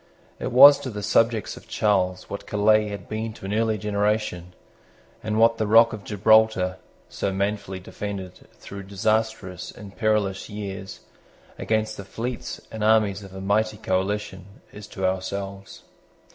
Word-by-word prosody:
It - - -3
was 140 +3 +9
to 130 - -5
the 105 -3 -6
subjects 115 +1 +1
of - - -14
Charles 95 -3 0
what 100 - -7
Calais 105 +1 +3
had 100 -2 -7
been 110 +1 -4
to 95 - -11
an 100 - -3
earlier 110 0 +1
generation, 105 -3 -1 0.7
and 110 0 -2
what 115 +1 +4
the 110 - 0
rock 115 +2 +6
of 105 -2 -7
Gibraltar, 105 -3 +3 0.3
so 100 - -3
manfully 100 -1 -2
defended, 95 -1 -7
through 100 0 -10
disastrous 110 -2 -1
and 100 -1 -11
perilous 105 -4 0
years, 100 -2 -7 0.6
against 110 -1 -1
the 100 - -7
fleets 115 +5 -5
and 110 -1 -5
armies 105 -2 +3
of 95 -1 -12
a 95 - -7
mighty 105 +2 0
coalition, 95 0 -2 0.3
is 105 0 -10
to 95 -2 -4
ourselves. 95 +1 -4
105 Hz, 150 wpm, -24 LUFS, 95-110 Hz, 0.7 s, was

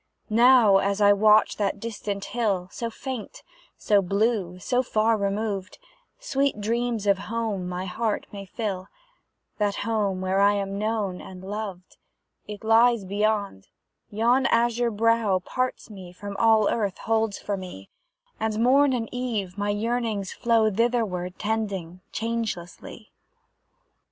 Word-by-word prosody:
Now, 235 -3 +6
as 200 +1 0
I 205 -1 +6
watch 215 +1 +4
that 200 -1 -1
distant 205 -2 -4
hill, 200 -7 0
So 235 - -4
faint, 250 -1 -7 0.3
so 205 -2 +3
blue, 195 -1 0
so 245 +7 0
far 225 -2 +1
removed, 200 -1 -2 0.4
Sweet 280 - -1
dreams 230 0 -1
of 200 -1 +3
home 215 -5 -2
my 180 +1 -4
heart 215 +3 -2
may 200 -1 -8
fill, 195 -4 -4 0.7
That 205 -1 +1
home 210 -4 0
where 185 +1 0
I 200 +1 +5
am 200 0 -3
known 210 -4 -2
and 185 -1 -11
loved: 195 -2 -6 0.5
It 210 0 -8
lies 225 -1 +4
beyond; 200 - -1 0.4
yon 240 +5 +2
azure 235 +1 +2
brow 225 -2 +2
Parts 250 +5 -3
me 185 -3 -10
from 200 +2 -8
all 220 -2 +4
Earth 205 -5 -1
holds 225 -2 0
for 205 - -3
me; 180 - -9 0.5
And, 220 -1 -1
morn 265 +3 +4
and 230 -3 -2
eve, 225 -7 -3
my 205 0 -2
yearnings 215 -2 -1
flow 230 -2 +2
Thitherward 205 -5 -1
tending, 200 -5 -3
changelessly. 225 -6 -5
210 Hz, 135 wpm, -25 LUFS, 195-230 Hz, 0.7 s, Now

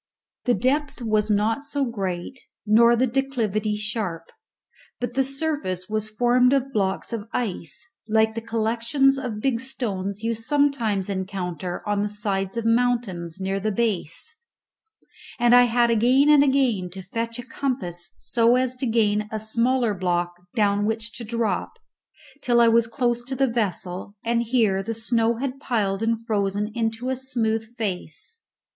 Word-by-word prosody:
The 245 - +3
depth 275 0 0
was 215 -1 +1
not 215 +4 +2 0.3
great 195 +3 -4 0.3
nor 235 +3 +6
the 250 +2 +3
declivity 230 -5 -1
sharp; 210 -5 -4 0.7
but 245 0 -3
the 270 +1 +2
surface 270 - -2
was 215 0 -2
formed 245 +3 +3
of 270 0 0
blocks 195 +1 -1
of 225 -1 -4
ice, 190 - -4 0.2
like 220 0 +3
the 230 - -4
collections 230 +5 +1
of 240 -6 -4
big 255 -2 +1
stones 205 -6 -4
you 230 0 +1
sometimes 230 -5 +1
encounter 185 -2 -4
on 205 -1 +1
the 210 - -1
sides 200 -1 -2
of 230 - -2
mountains 230 -8 0
near 195 +1 -1
the 215 +2 -1
base; 225 - -2 1.0
and 240 0 +4
I 245 0 +8
had 235 0 +3
again 250 +6 +4
and 295 -2 +7
again 260 -10 +2
to 190 -1 -8
fetch 230 +4 -4
a 245 - -7
compass 185 -11 -3
so 235 0 +2
as 255 0 +1
to 255 - -2
gain 210 -2 +1
a 220 - -2
smaller 230 +2 +1
block 175 -2 -1 0.2
down 205 -1 +2
which 225 +1 -3
to 235 - -6
drop, 230 -1 -1 0.7
till 240 -1 +3
I 235 -1 +6
was 230 0 +4
close 240 0 0
to 265 +1 -4
the 270 +1 +3
vessel, 200 -5 -2
and 235 0 +2
here 225 -5 +2
the 225 +3 -4
snow 230 +1 +1
had 265 +2 -4
piled 205 -7 -1
and 230 0 0
frozen 205 -1 -1
into 225 +1 -2
a 260 - 0
smooth 235 -4 -1
face. 200 - -4
225 Hz, 155 wpm, -24 LUFS, 205-245 Hz, 1.0 s, I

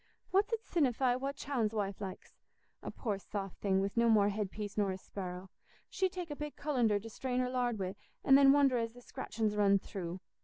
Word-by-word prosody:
"What's 400 +4 +3
it 455 -1 -1
sinnify 260 -6 +2
what 275 +1 -3
Chowne's 240 -6 -1
wife 200 -1 -2
likes? 190 -2 -7 0.5
A - - -5
poor 210 -5 -3
soft 195 -1 -6
thing, 190 -1 +2
wi' 195 +1 -1
no 235 0 +4
more 205 -2 +5
head 205 -1 -2
piece 205 0 -6
nor 205 -2 +1
a 190 - -2
sparrow. 185 -1 -7 0.4
She'd 375 -2 +1
take 355 -4 -5
a - - -3
big 300 0 -6
cullender 245 -8 +1
to 220 - -9
strain 250 +3 -2
her 250 0 0
lard 245 -3 0
wi', 190 -1 -3 0.3
and 270 - +7
then 275 0 +8
wonder 275 -3 +4
as 230 0 -2
the 245 - -13
scratchin's 215 -3 -2
run 200 -1 +5
through. 185 -2 -6
225 Hz, 215 wpm, -33 LUFS, 200-270 Hz, 0.5 s, then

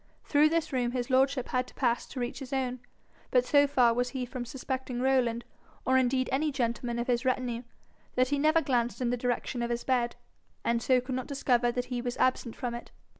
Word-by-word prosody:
Through 300 +1 +4
this 330 -3 -1
room 245 -2 0
his 250 0 -2
lordship 265 0 +2
had 255 0 0
to - - -16
pass 240 -3 0
to 260 - -7
reach 245 +1 -3
his 270 -2 -8
own; 255 -2 -1 0.5
but 250 -1 +3
so 285 +2 +5
far 250 -4 +4
was 245 +1 0
he 255 0 -3
from 245 0 -6
suspecting 260 0 -4
Rowland, 250 -3 +1 0.4
or 260 - +3
indeed 255 0 +2
any 300 +3 +1
gentleman 240 -2 -1
of 235 - -1
his 245 -1 +1
retinue, 250 -2 0 0.5
that 255 0 +3
he 285 0 +1
never 310 +3 +4
glanced 245 -3 0
in 245 -2 0
the - - +1
direction 245 0 -2
of 235 - -1
his 235 0 -2
bed, 245 -2 +1 0.5
and 235 0 +1
so 255 +1 +3
could 255 +1 -5
not 255 -1 -3
discover 250 -4 +2
that 245 0 -1
he 245 - -1
was 245 0 -3
absent 255 -2 +1
from 245 -2 -3
it. 235 - -7
250 Hz, 220 wpm, -29 LUFS, 240-265 Hz, 0.5 s, so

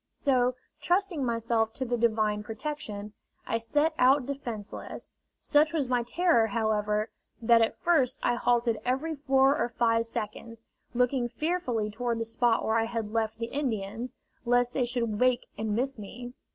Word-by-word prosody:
So, 250 -2 +2 0.3
trusting 360 -4 +1
myself 230 -2 0
to 260 - -2
the 245 0 0
Divine 215 -3 +1
protection, 215 -3 -5 0.3
I 230 - -1
set 295 +8 +1
out 260 +1 +5
defenceless. 240 -7 -6 0.2
Such 300 +1 +3
was 285 -6 0
my 250 -1 +2
terror, 240 -2 +2
however, 215 -1 0 0.3
that 230 0 +5
at 225 - +1
first 300 -8 +2
I - - +3
halted 240 -2 +1
every 270 +6 -1
four 275 -1 +3
or 240 - 0
five 230 -1 +1
yards, 225 +2 -6 0.3
looking 250 0 +1
fearfully 245 -6 -1
toward 235 +1 -2
the 230 - -2
spot 225 0 +1
where 220 +1 +2
I 225 - +1
had 225 -2 -4
left 220 -1 0
the 230 - -2
Indians, 235 -4 -3 0.3
lest 245 0 +2
they 255 - +1
should 235 -3 -2
wake 250 -1 +3
and 215 -1 -2
miss 260 +1 -1
me. 245 +4 -8
240 Hz, 160 wpm, -28 LUFS, 225-265 Hz, 0.3 s, out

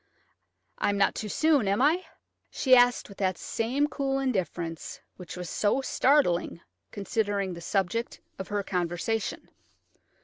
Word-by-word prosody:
I - - +1
am 200 - 0
not 200 - +3
too 215 - -5
soon, 295 -4 +2
am 200 +1 +1
I?" 315 +7 +3 0.5
she 255 -2 +4
asked, 245 -1 +4
with 200 - -14
that 185 -2 0
same 250 +6 -1
cool 275 -2 -1
indifference 180 -10 -3 0.2
which 180 -1 -9
was 180 -1 -5
so 205 +9 +1
startling, 260 - +2 0.3
considering 200 -2 -2
the 170 - -9
subject 195 +6 -1 0.2
of 190 - -5
her 205 -1 -2
conversation. 180 +4 -2
205 Hz, 140 wpm, -27 LUFS, 185-255 Hz, 0.5 s, she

